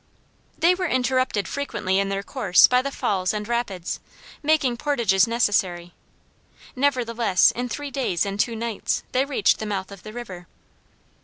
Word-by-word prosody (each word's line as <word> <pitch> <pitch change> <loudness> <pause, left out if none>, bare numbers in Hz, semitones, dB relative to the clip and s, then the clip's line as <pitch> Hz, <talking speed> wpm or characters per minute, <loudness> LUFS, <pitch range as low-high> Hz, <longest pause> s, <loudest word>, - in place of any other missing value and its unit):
They 345 +2 +4
were 365 0 -2
interrupted 255 -5 0
frequently 195 -9 -1
in 195 0 0
their 195 0 -2
course 200 -6 +4
by 250 0 +3
the 275 - -3
falls 190 -7 -1
and 210 0 -4
rapids, 220 -7 -3 0.4
making 285 -5 +2
portages 235 -9 +2
necessary; 190 -7 0 0.8
nevertheless 240 -7 +2
in 245 +1 -4
three 290 +3 -5
days 245 - -1
and 200 0 -4
two 230 +1 +1
nights 230 -1 -2
they 260 +2 +1
reached 270 -8 +2
the 220 - -4
mouth 195 -2 -3
of 200 -2 -11
the 215 - -9
river. 190 -7 -8
230 Hz, 155 wpm, -23 LUFS, 195-260 Hz, 0.8 s, They